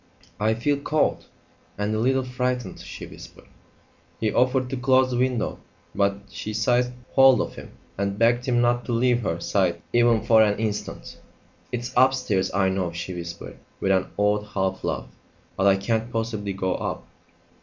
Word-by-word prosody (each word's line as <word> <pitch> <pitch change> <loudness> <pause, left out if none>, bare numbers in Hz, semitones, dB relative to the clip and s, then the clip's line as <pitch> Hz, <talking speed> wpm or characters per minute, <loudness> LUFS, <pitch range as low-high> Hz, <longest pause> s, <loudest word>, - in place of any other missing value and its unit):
"I 110 +1 +2
feel 140 +5 0
cold 150 +2 0 0.5
and 105 +1 -1
a 110 - 0
little 130 +3 +2
frightened," 125 -4 -3
she - - -8
whispered. - - -13 0.7
He 110 -2 0
offered 130 +1 +2
to - - -1
close 130 0 +3
the 120 - -1
window, 125 -2 0 0.3
but 100 0 +1
she 105 +2 -6
seized 120 +2 +2 0.2
hold 135 -1 +6
of - - -2
him - - -11 0.3
and 100 0 -1
begged 120 +3 +2
him 120 -1 +2
not 120 0 +2
to 120 - -2
leave 120 +1 +2
her 85 -6 -2
side 90 -1 0
even 120 -1 +4
for 110 -1 +5
an 105 -1 +3
instant. 105 -1 -4 0.5
"It's 120 0 -4
upstairs, 125 -7 +2
I 95 0 +2
know," 95 -2 -1
she 90 +2 -5
whispered, 85 -1 -8 0.2
with 95 - +1
an 95 -1 +2
odd 105 0 +2
half 95 -1 -1
laugh; - - -2 0.5
"but 95 - +2
I 100 - +6
can't 110 +4 -1
possibly 110 -3 -2
go 95 -1 -1
up." - - -4
110 Hz, 170 wpm, -24 LUFS, 100-125 Hz, 0.7 s, hold